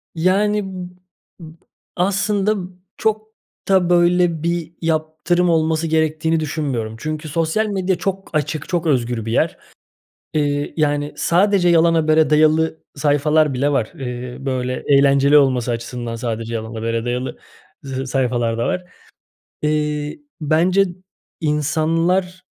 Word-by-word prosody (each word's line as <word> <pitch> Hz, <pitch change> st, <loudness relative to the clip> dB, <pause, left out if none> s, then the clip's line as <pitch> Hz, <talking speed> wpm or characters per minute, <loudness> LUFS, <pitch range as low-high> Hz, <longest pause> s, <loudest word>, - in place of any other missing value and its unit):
Yani, 200 Hz, +5 st, +2 dB
b 185 Hz, -2 st, -7 dB, 0.5 s
b 160 Hz, -2 st, -11 dB, 0.4 s
aslında, 200 Hz, +2 st, +1 dB
b 180 Hz, -, -8 dB, 0.3 s
çok 215 Hz, 0 st, 0 dB, 0.4 s
da, 190 Hz, -3 st, +3 dB
böyle, 175 Hz, -2 st, +3 dB
bir 170 Hz, -1 st, -1 dB
yaptırım 160 Hz, +2 st, 0 dB
olması 160 Hz, 0 st, +1 dB
gerektiğini 160 Hz, +1 st, +1 dB
düşünmüyorum. 140 Hz, -8 st, -3 dB
Çünkü 155 Hz, +2 st, -4 dB
sosyal 165 Hz, +8 st, 0 dB
medya 190 Hz, -2 st, 0 dB
çok 195 Hz, 0 st, -3 dB
açık, 155 Hz, 0 st, -2 dB
çok 175 Hz, -2 st, -1 dB
özgür 120 Hz, -5 st, 0 dB
bir 115 Hz, -, -3 dB
yer. -, -, +1 dB, 0.8 s
İii, 145 Hz, -1 st, 0 dB
yani, 145 Hz, -1 st, 0 dB
sadece 185 Hz, +1 st, +3 dB
yalan 165 Hz, 0 st, +4 dB
habere 155 Hz, -1 st, +3 dB
dayalı 155 Hz, +1 st, +3 dB, 0.2 s
sayfalar 150 Hz, 0 st, +2 dB
bile 140 Hz, +3 st, +1 dB
var. 120 Hz, -6 st, 0 dB
Iıı, 125 Hz, 0 st, -6 dB
böyle, 130 Hz, -1 st, -2 dB
eğlenceli 140 Hz, +1 st, +5 dB
olması 130 Hz, -4 st, +2 dB
açısından 120 Hz, 0 st, -4 dB
sadece 115 Hz, 0 st, -4 dB
yalan 110 Hz, 0 st, -5 dB
habere 115 Hz, +1 st, -2 dB
dayalı 125 Hz, +1 st, -3 dB, 0.4 s
z 135 Hz, -1 st, -6 dB
s 130 Hz, +1 st, -3 dB
sayfalar 120 Hz, -3 st, 0 dB
da 120 Hz, -, 0 dB
var. 180 Hz, -, -2 dB, 0.8 s
Eee, 150 Hz, -, -1 dB, 0.2 s
bence 175 Hz, +6 st, +3 dB, 0.6 s
insanlar 165 Hz, +5 st, 0 dB
155 Hz, 130 wpm, -20 LUFS, 135-175 Hz, 0.8 s, eğlenceli